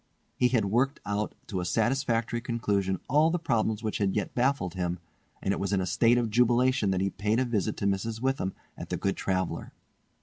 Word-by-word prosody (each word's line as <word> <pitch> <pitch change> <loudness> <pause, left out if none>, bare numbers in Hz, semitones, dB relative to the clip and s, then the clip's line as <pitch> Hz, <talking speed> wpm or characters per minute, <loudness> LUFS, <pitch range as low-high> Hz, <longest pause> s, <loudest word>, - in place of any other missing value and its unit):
He 125 - +3
had 120 -4 +2
worked 125 +8 +1
out 105 +1 -2
to 95 - -3
a - - -2
satisfactory 120 +4 0
conclusion 100 -6 -1
all 150 +4 +4
the 175 - +1
problems 110 -8 0
which 110 - -2
had 100 -2 +2
as - - -3
yet 105 - -1
baffled 125 -8 +1
him, 90 -1 -2 0.5
and 95 - +1
it - - -1
was 100 0 -1
in 100 - +2
a 95 - 0
state 115 +5 +3
of 115 -3 0
jubilation 125 -1 +3
that 95 -1 +1
he 95 0 0
paid 105 +3 0
a 130 - +2
visit 110 -3 -1
to - - -2
Mrs. 100 +3 -1
Witham 130 -7 -1 0.2
at - - -8
"The - - -1
Good 100 - -1
Traveller". 95 -2 -2
110 Hz, 215 wpm, -28 LUFS, 95-125 Hz, 0.5 s, all